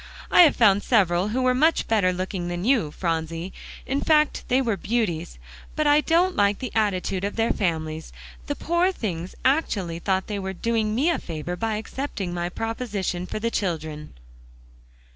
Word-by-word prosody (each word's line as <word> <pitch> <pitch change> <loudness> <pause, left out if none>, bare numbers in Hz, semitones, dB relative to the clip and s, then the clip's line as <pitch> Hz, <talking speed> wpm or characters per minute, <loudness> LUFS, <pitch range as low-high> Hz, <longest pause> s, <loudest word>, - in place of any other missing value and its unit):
I - - +8
have 325 -4 +6
found 205 -3 +5
several 190 -6 +2
who 250 +5 -1
were 255 0 +3
much 310 +6 +2
better 205 -5 +3
looking 185 0 -3
than 175 +2 -3
you, 235 - +3
Phronsie; 165 +2 -3 0.3
in 275 +2 -1
fact, 305 -2 +2
they 255 - +3
were 235 -5 0
beauties; 190 - -2 0.4
but 305 - 0
I 295 +1 +5
don't 350 +4 +2
like 200 0 +3
the 255 - -5
attitude 195 -3 0
of 200 - -2
their 230 0 +1
families. 160 -4 -2 0.4
The 290 - -2
poor 345 +4 +1
things 180 - -5
actually 200 - +1
thought 190 +1 0
they 205 -2 -4
were 190 0 -4
doing 220 +2 -1
me 295 +8 +2
a - - -1
favor 165 +2 -5
by 220 +4 -2
accepting 215 -4 -4
my 175 0 -2
proposition 205 -4 -3
for - - -4
the 230 +2 -1
children." 155 - -3
205 Hz, 175 wpm, -24 LUFS, 175-250 Hz, 0.4 s, I